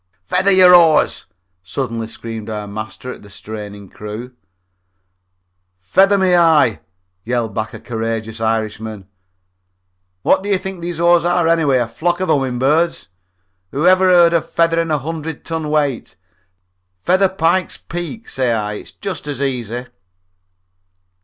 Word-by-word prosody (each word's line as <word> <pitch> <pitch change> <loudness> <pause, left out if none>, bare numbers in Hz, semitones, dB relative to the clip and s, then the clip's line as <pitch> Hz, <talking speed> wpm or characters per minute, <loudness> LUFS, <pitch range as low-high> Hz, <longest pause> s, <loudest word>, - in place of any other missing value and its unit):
"Feather 195 - +1
your 185 -2 +7
oars!" 165 -3 +4 0.3
suddenly 115 +4 -4
screamed 115 -1 -7
our 105 -1 -4
master 110 +4 -7
at - - -14
the 105 - -15
straining 105 0 -9
crew. 105 +6 -8 1.4
"Feather 190 - +3
me 190 -2 +2
eye!" 160 - +4 0.4
yelled 115 -2 -2
back 110 +1 -3
a - - -8
courageous 115 -1 -4
Irishman. 110 -2 -3 1.2
"What - - +3
do 200 - -5
you 200 - +3
think 190 -1 -7
these 170 -1 -5
oars 170 0 +4
are, 175 -1 +2
anyway 160 -5 +3
a 120 -2 0
flock 175 +10 -1
of 185 - -2
humming 130 -3 +1
birds? 155 +7 +1 0.6
Whoever 185 - +3
heard 175 -2 +6
of 170 - 0
feathering 165 0 +1
a 155 - +2
hundred 160 +1 -6
ton 160 -2 -3
weight? 145 -4 -1 0.9
Feather 185 +2 +3
Pike's 185 0 0
Peak, 175 +7 -7
say 130 -2 -1
I; 105 -2 -2
it's 105 - -9
just 190 -7 -6
as 145 -3 -4
easy." 125 -3 -3
140 Hz, 140 wpm, -18 LUFS, 110-170 Hz, 1.4 s, your